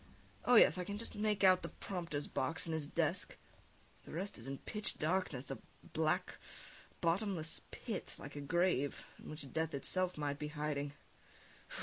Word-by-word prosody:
Oh, 245 - +6
yes, 200 - +8
I - - 0
can 205 +3 -4
just 230 - -2
make 210 -1 +1
out 185 -1 +7
the - - -4
prompter's 170 -6 -3
box, 160 +5 0
and 165 - -1
his 155 -2 -1
desk; - - 0 0.7
the - - -11
rest 185 -2 -3
is 115 - -6
in 135 0 -3
pitch 210 +9 0
darkness, 155 -6 0
a 135 - -4 0.3
black, - - +1 0.6
bottomless 170 -2 0
pit, 220 -6 -4
like 140 +1 -8
a 145 - -4
grave, 160 -2 +2
in - - -10
which 150 -4 -7
death 160 -2 0
itself 180 +6 0
might 145 -1 -1
be 150 - -2
hiding.... 150 -2 -2
160 Hz, 165 wpm, -37 LUFS, 145-185 Hz, 0.7 s, yes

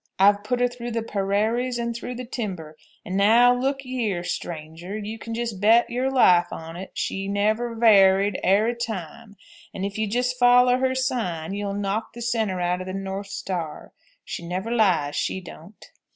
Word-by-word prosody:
I've 205 +1 +4
put 245 +3 -1
her 245 - +4
through 240 -1 -7
the 230 -1 -1
perarries 220 +5 0
and 235 0 -3
through 245 +1 -6
the 250 +1 -6
timber, 185 -10 -5 0.3
and 185 - -4
now 230 +5 +5
look 270 +2 -2
yeer, 225 -9 -2
straanger, 170 +3 -5
you 215 +1 -6
can 230 0 -6
just 230 -4 -4
bet 230 +4 +4
your 255 +2 0
life 180 -10 +5
on't 165 +4 -7
she 195 0 -2
never 215 +4 0
var 200 -4 +6
ried 200 -1 -1
arry 210 +6 +3
time, 220 -1 -6 0.4
and 190 - -3
if 200 +2 -5
you'll 215 -1 0
just 250 +3 -1
follow 245 0 +5
her 260 0 +1
sign 220 - -2
you'll 200 0 -3
knock 205 +2 -2
the 240 - -9
centre 220 -6 -1
outer 180 +1 -1
the 185 - -5
north 195 +1 -5
star. 175 -5 -5 0.3
She - - -5
never 185 +6 -4
lies, 185 -11 +2
she - - -1
don't." 180 +2 -13
210 Hz, 180 wpm, -24 LUFS, 190-240 Hz, 0.4 s, var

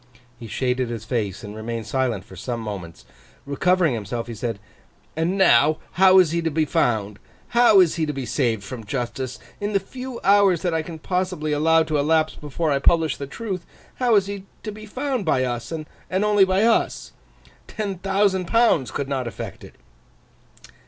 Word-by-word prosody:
He 115 - -8
shaded 125 +2 -1
his 115 -2 -5
face, 110 -3 -2
and 105 0 -8
remained 115 +1 -5
silent 125 -7 -1
for 95 - -13
some 120 +5 -4
moments. 100 -7 -7 0.4
Recovering 170 +2 +2
himself, 115 +1 -4
he 120 - -7
said: 115 0 -3 0.6
'And 165 +5 0
now, 155 -4 +5
how 190 +1 +6
is 180 -4 +5
he 170 0 0
to 165 - 0
be 155 0 +1
found? 105 -7 0 0.3
How 235 -4 +6
is 170 -2 +2
he 160 -2 0
to - - -1
be 135 -3 -5
saved 115 -6 0
from 115 +2 -7
justice? 125 +2 -4 0.2
In 205 +1 -2
the 200 - +3
few 250 +5 -8
hours 195 -3 +4
that 175 -2 0
I 160 - +1
can 160 +1 -8
possibly 180 -2 -2
allow 160 +2 +4
to 155 -2 -1
elapse 155 +2 +2
before 150 +2 -3
I 140 - +2
publish 160 +1 +2
the 140 - -6
truth, 190 - -5 0.3
how 245 -3 +3
is 200 -2 +4
he 200 -1 -6 0.2
to 215 - -4
be 215 +1 -10
found 260 0 -2
by 145 -6 +2
us, 120 +1 -3
and 160 -1 -4 0.4
only 205 -2 +5
by 190 +2 +2
us? 230 0 +1 0.6
Ten 200 -4 -4
thousand 195 0 +1
pounds 230 - +3
could 140 - -3
not 135 -3 -2
effect 115 - -7
it. - - -13
155 Hz, 185 wpm, -23 LUFS, 120-190 Hz, 0.6 s, how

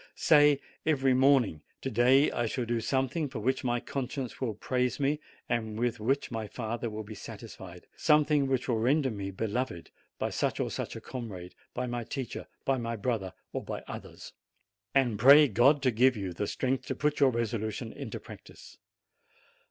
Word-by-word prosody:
Say 145 -2 +5 0.2
every 135 -4 +3
morning, 130 - +4 0.2
"To 135 - -3
day 125 +5 +5
I 120 -1 -1
shall 120 +2 -2
do 120 0 0
something 135 +5 0
for 130 - -6
which 130 +5 0
my 120 -1 +1
conscience 130 0 -5
will 115 -5 -1
praise 125 +3 -1
me, 145 +2 +1 0.3
and 110 -2 -2
with 120 0 0
which 135 +6 0
my 110 -2 -3
father 115 +1 -4
will 110 0 -5
be 110 +1 -9
satisfied; 100 -4 -10
something 150 -2 +3
which 130 -2 0
will 120 -3 +1
render 135 +3 +2
me 100 -2 -4
beloved 105 -1 -3 0.3
by - - -2
such - - -1
or - - -1
such - - -4
a - - -7
comrade, 100 -9 -7 0.2
by 125 - -1
my 120 -1 -3
teacher, 130 +2 -5 0.2
by 135 -1 +1
my 115 0 -3
brother, 105 -4 -2 0.2
or - - -3
by - - -5
others." - - -9 0.6
And 120 -6 +2
pray 145 +5 +9
God 135 +5 +4
to 130 - +4
give 125 +2 +4
you 95 -3 -4
the 100 +4 -3
strength 130 0 -1
to 130 - -2
put 150 +2 0
your 140 -2 +6
resolution 110 -3 -2
into - - -6
practice. - - -13
125 Hz, 180 wpm, -30 LUFS, 110-135 Hz, 0.6 s, pray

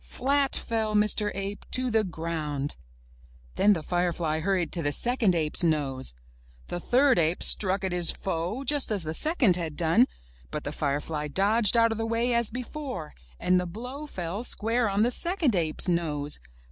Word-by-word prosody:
Flat 275 +1 +1
fell 220 -2 -2
Mr. 210 0 +3
Ape 195 +1 -5
to 255 -1 -1
the 220 -1 +2
ground! 160 -5 -4 0.8
Then 210 +1 +4
the 165 -5 -4
firefly 175 -3 -1
hurried 185 0 -1
to 170 - 0
the 145 -2 0
second 230 - +3
ape's 155 +1 +1
nose 135 - -1 0.5
The 175 - -4
third 255 +4 +3
ape 165 +1 0
struck 190 -1 +2
at 190 - -2
his 175 -1 +3
foe, 190 +8 -3
just 285 +1 +1
as 200 -5 -1
the 155 0 -4
second 245 - +3
had 160 -4 -5
done, 175 +10 +3 0.4
but 150 - -5
the 145 - -4
firefly 150 +1 -3
dodged 205 - +3
out 230 0 +4
of 225 - -4
the 225 - -2
way 230 +2 0
as 235 -2 +1
before, 250 - -6 0.3
and 180 0 +2
the 180 - -3
blow 250 - -8
fell 185 - -5
square 230 0 0
on 200 +2 +1
the 240 - +1
second 340 - +3
ape's 160 -1 +1
nose 150 -4 0
195 Hz, 175 wpm, -26 LUFS, 165-235 Hz, 0.8 s, Then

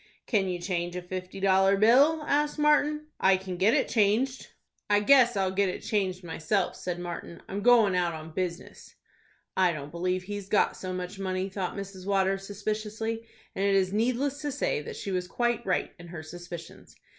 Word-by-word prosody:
"Can 200 -5 +1
you 180 - -2
change 175 -1 -3
a 180 - -3
fifty 185 +1 -6
dollar 195 0 +4
bill?" 275 +9 +5
asked 295 +1 +1
Martin. 300 0 +3
"I 190 0 +5
can 185 -1 -6
get 195 +6 +3
it - - +2
changed." 235 +5 +1 0.4
"I 205 0 +5
guess 245 -1 +5
I'll 190 -1 +1
get 195 0 +1
it - - -5
changed 190 -3 -1
myself," 175 +3 -1
said 180 -1 -4
Martin. 175 -1 -7
"I'm 200 +1 -4
goin' 230 -4 +5
out 175 -2 +1
on 160 0 -9
business." 180 0 -5 0.6
"I 185 -2 +4
don't 145 -1 -7
believe 180 +2 -1
he's 205 0 -6
got 210 - +3
so 185 - -5
much 180 +2 -5
money," 190 0 -2
thought 190 -2 -4
Mrs. 195 -1 -7
Waters, 195 0 +1
suspiciously, 215 +2 -3 0.3
and 195 - -2
it 200 0 +3
is 190 0 +2
needless 255 +6 0
to 295 -1 -2
say 475 - -1
that 460 - -7
she 200 - -5
was 180 -1 -1
quite 240 +2 0
right 180 - 0
in 175 - -11
her 165 -2 -8
suspicions. 175 +1 -10
195 Hz, 190 wpm, -28 LUFS, 180-225 Hz, 0.6 s, bill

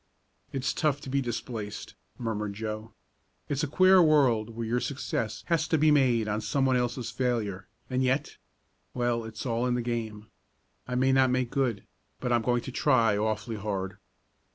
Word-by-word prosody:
"It's 135 0 -1
tough 150 -4 +1
to 130 - -7
be 140 0 +2
displaced," 115 -3 -5 0.2
murmured 105 -4 -3
Joe. 110 +1 -5 0.6
"It's 140 -1 0
a 155 - 0
queer 185 +5 +6
world 135 -9 +4
where 115 0 -5
your 120 +2 0
success 130 -5 -3
has 165 -3 +1
to 160 - +2
be 155 +1 +4
made 125 -6 +3
on 105 +1 -1
someone 130 +4 +1
else's 125 -1 -1
failure, 110 -7 -2 0.2
and 130 0 -1
yet 130 +3 0 0.6
well, 120 -1 0
it's 110 +2 -7
all 120 0 0
in 125 - +1
the 125 - 0
game. 110 -3 -3 0.6
I 125 - -3
may 130 +1 +3
not 130 -1 +4
make 125 -1 0
good, 125 -8 0 0.4
but 125 -1 0
I'm 120 - +3
going 120 +1 +1
to 130 - -6
try 120 -6 +3
awfully 110 +2 -1
hard!" 100 -2 -4
120 Hz, 175 wpm, -28 LUFS, 110-130 Hz, 0.6 s, queer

